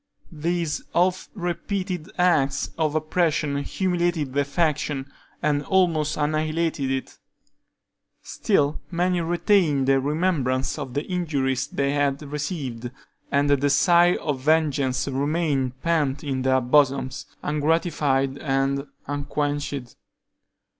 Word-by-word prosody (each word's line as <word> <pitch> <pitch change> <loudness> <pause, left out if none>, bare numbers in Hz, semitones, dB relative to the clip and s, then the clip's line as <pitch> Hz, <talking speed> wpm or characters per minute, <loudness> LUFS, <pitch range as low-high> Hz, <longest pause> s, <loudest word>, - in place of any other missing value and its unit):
These 165 0 -1
oft 185 +2 +2
repeated 180 -1 -3
acts 145 -7 +2
of 155 -2 0
oppression 155 -2 +1
humiliated 175 -2 -1
the 145 +1 +2
faction, 145 -2 -1 0.4
and 145 -1 +2
almost 165 -3 +1
annihilated 155 -1 0
it. 135 0 -4 1.0
Still, 145 +1 0
many 180 0 +1
retained 170 -5 +2
the 135 0 +4
remembrance 140 -3 0
of 130 -2 -6
the 145 - 0
injuries 140 -8 -1
they 140 -1 -1
had 145 0 0
received, 140 -5 -4 0.4
and 145 0 +2
a - - +6
desire 170 +6 +4
of 145 -4 -2
vengeance 145 -3 +1
remained 140 -2 0
pent 150 -5 +1
in 135 -3 -2
their 130 0 +2
bosoms, 135 0 +2 0.2
ungratified 145 -3 +1
and 135 0 0 0.2
unquenched. 145 -2 -3
145 Hz, 105 wpm, -24 LUFS, 135-170 Hz, 1.0 s, a